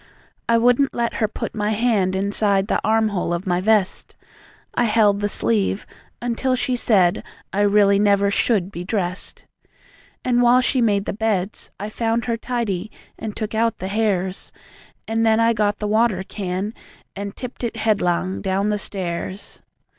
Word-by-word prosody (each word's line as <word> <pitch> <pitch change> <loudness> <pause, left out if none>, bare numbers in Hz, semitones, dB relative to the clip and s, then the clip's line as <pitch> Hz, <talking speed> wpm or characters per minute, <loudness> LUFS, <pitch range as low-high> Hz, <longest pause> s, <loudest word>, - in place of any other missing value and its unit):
I 230 - +5
wouldn't 245 +4 +3
let 235 -1 -1
her 215 - +1
put - - -5
my 210 0 -1
hand 210 -5 +1
Inside 200 0 +1
the - - 0
arm 220 0 +2
hole 180 -4 -1
of 175 +4 -5
my 180 -1 0
vest; 210 -2 +1 0.6
I 240 - +2
held 210 -2 +3
the 205 - 0
sleeve 205 -2 0 0.4
until 245 +2 0
she 255 0 0
said 190 -7 +2 0.3
I 200 - +1
really 200 -1 +4
never 200 -1 +3
SHOULD 200 -3 +1
be 175 -2 -6
dressed. 185 -2 -4 0.8
And 245 -1 +3
while 245 +1 +5
she 255 +1 +1
made 205 -3 +2
the - - -2
beds, 210 -2 -2
I 205 +2 -4
found 230 +1 -1
Her 235 -2 0
tidy, 225 -5 -3 0.3
and 215 -2 -5
took 215 0 -4
out 225 0 +1
the 190 - -5
hairs; 195 -3 -1 0.6
And 225 0 0
then 220 0 +4
I 230 0 +4
got 205 -1 0
the 210 - -3
water 215 -3 +2
can 195 +1 -4 0.4
And 200 0 -5
tipped 250 0 -8
it 235 -1 -2
headlong 190 -4 0
down 195 +1 0
the 210 0 0
stairs. 185 0 -5
210 Hz, 170 wpm, -21 LUFS, 195-230 Hz, 0.8 s, I